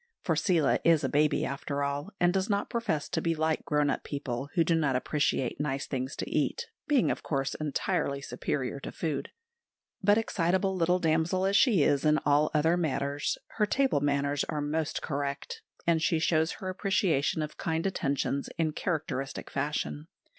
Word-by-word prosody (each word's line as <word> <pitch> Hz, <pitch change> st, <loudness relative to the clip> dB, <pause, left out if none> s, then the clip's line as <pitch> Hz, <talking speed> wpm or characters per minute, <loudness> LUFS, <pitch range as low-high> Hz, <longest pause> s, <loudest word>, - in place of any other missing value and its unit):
For 165 Hz, -, +1 dB
Seela 165 Hz, -2 st, +2 dB
is 165 Hz, -3 st, +4 dB
a -, -, +1 dB
baby 150 Hz, 0 st, +2 dB
after 140 Hz, +1 st, -3 dB
all, 140 Hz, +5 st, -2 dB
and 175 Hz, 0 st, +3 dB
does 190 Hz, +2 st, 0 dB
not 200 Hz, -1 st, 0 dB
profess 230 Hz, -, -1 dB
to -, -, -1 dB
be 165 Hz, -1 st, 0 dB
like 160 Hz, 0 st, 0 dB
grown 150 Hz, -1 st, +2 dB
up -, -, -3 dB
people 140 Hz, -2 st, -4 dB
who 170 Hz, -, +4 dB
do 165 Hz, -, +1 dB
not 150 Hz, -5 st, +2 dB
appreciate 135 Hz, -1 st, 0 dB
nice 140 Hz, -2 st, -2 dB
things 130 Hz, 0 st, -3 dB
to -, -, -4 dB
eat, 475 Hz, -, 0 dB, 0.2 s
being, 285 Hz, -5 st, +3 dB
of -, -, -3 dB
course, 135 Hz, -2 st, -1 dB
entirely 140 Hz, -1 st, -1 dB
superior 140 Hz, -1 st, -3 dB
to -, -, -7 dB
food; 155 Hz, -5 st, -3 dB, 0.7 s
but, 205 Hz, +1 st, +4 dB
excitable 190 Hz, -2 st, +1 dB
little 180 Hz, 0 st, +2 dB
damsel 165 Hz, +2 st, +1 dB
as 195 Hz, +1 st, +2 dB
she 200 Hz, -, +5 dB
is 140 Hz, -1 st, +2 dB
in 155 Hz, 0 st, +4 dB
all 145 Hz, +1 st, +4 dB
other 160 Hz, +3 st, +3 dB
matters, 145 Hz, -3 st, -1 dB, 0.2 s
her 210 Hz, -2 st, +3 dB
table 265 Hz, -, +2 dB
manners 140 Hz, 0 st, +1 dB
are 150 Hz, -, -3 dB
most 150 Hz, +1 st, -2 dB
correct, 145 Hz, -, -3 dB, 0.2 s
and 165 Hz, -1 st, +3 dB
she 165 Hz, 0 st, +2 dB
shows 160 Hz, 0 st, +2 dB
her 190 Hz, -3 st, -6 dB
appreciation 185 Hz, -6 st, +1 dB
of 150 Hz, -, -7 dB
kind 165 Hz, +1 st, -1 dB
attentions 140 Hz, -6 st, -1 dB
in 160 Hz, -2 st, +1 dB
characteristic 150 Hz, -4 st, -3 dB
fashion. 150 Hz, +2 st, -2 dB
155 Hz, 175 wpm, -29 LUFS, 140-175 Hz, 0.7 s, she